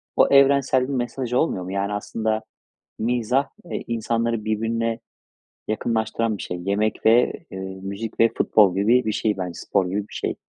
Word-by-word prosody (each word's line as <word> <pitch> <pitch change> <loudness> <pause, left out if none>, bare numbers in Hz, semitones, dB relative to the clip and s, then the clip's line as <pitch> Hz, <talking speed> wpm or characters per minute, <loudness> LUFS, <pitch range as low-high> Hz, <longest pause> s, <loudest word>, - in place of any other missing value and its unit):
o - - +5
evrensel 140 -2 +4
bir 140 - -3
mesaj 125 0 -3
olmuyor 125 - +1
mu? 90 - -6
Yani 100 +1 -1
aslında 110 +1 -2 0.6
mizah, 125 +3 +1 0.2
eee, - - -3
insanları 115 -1 -1
birbirine 115 +1 -1 0.7
yakınlaştıran 110 0 -1
bir - - -7
şey. 90 - -5
Yemek 105 +3 -1
ve, 115 +2 +5 0.2
eee, 95 - -6 0.2
müzik 100 +3 -6
ve 115 - +6
futbol 100 -4 +4
gibi 115 +6 +3
bir 110 - +1
şey 105 -1 0
bence. 90 -2 -4
Spor 95 +2 0
gibi 100 +2 -3
bir - - -15
şey. - - -2
110 Hz, 165 wpm, -23 LUFS, 105-120 Hz, 0.7 s, ve